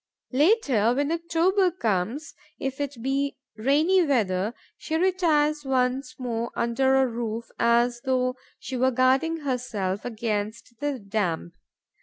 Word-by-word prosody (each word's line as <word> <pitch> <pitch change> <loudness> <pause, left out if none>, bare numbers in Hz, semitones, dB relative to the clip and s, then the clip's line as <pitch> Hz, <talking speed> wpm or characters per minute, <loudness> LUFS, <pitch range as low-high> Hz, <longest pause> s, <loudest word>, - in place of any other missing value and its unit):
Later, 265 - +3
when 285 +3 0
October 340 +3 +2
comes, 235 - -2 0.2
if 270 +1 -4
it 275 -5 -4
be 275 +1 -1 0.2
rainy 295 +11 +3
weather, 215 - 0 0.2
she 315 - -4
retires 320 -4 +2
once 265 +2 0
more 235 -3 -3
under 265 +3 +2
a 265 0 +4
roof, 230 -1 -4
as 240 +1 +3
though 255 -1 +1 0.2
she 260 - -6
were 255 +1 +3
guarding 265 +6 +2
herself 235 -8 -2
against 220 0 -3
the 290 -2 -1
damp. 200 -6 -2
255 Hz, 125 wpm, -25 LUFS, 230-295 Hz, 0.2 s, a